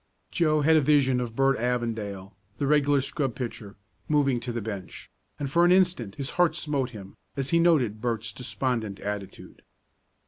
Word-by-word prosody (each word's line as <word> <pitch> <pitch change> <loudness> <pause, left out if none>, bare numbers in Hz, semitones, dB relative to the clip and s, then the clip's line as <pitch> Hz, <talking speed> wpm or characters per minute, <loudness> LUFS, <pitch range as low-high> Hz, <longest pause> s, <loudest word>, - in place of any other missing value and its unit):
Joe 155 -3 +2
had 160 +2 +5
a - - +4
vision 135 -3 +3
of 115 -2 -5
Bert 135 +1 +2
Avondale, 110 -5 -3 0.2
the 140 - -1
regular 145 -1 +3
scrub 135 -2 -2
pitcher, 115 -5 -6 0.3
moving 140 -5 +2
to 120 +1 -5
the 120 - -3
bench, 100 -4 -7 0.3
and 145 - -3
for 170 +3 +4
an 175 - +5
instant 180 - +2
his 140 +1 -4
heart 165 -3 +3
smote 145 -6 -1
him, 100 -5 -11 0.2
as 135 0 -2
he 170 - +4
noted 135 -11 +2
Bert's 115 -3 -2
despondent 125 -4 -3
attitude. 100 -1 -7
130 Hz, 170 wpm, -26 LUFS, 110-150 Hz, 0.3 s, had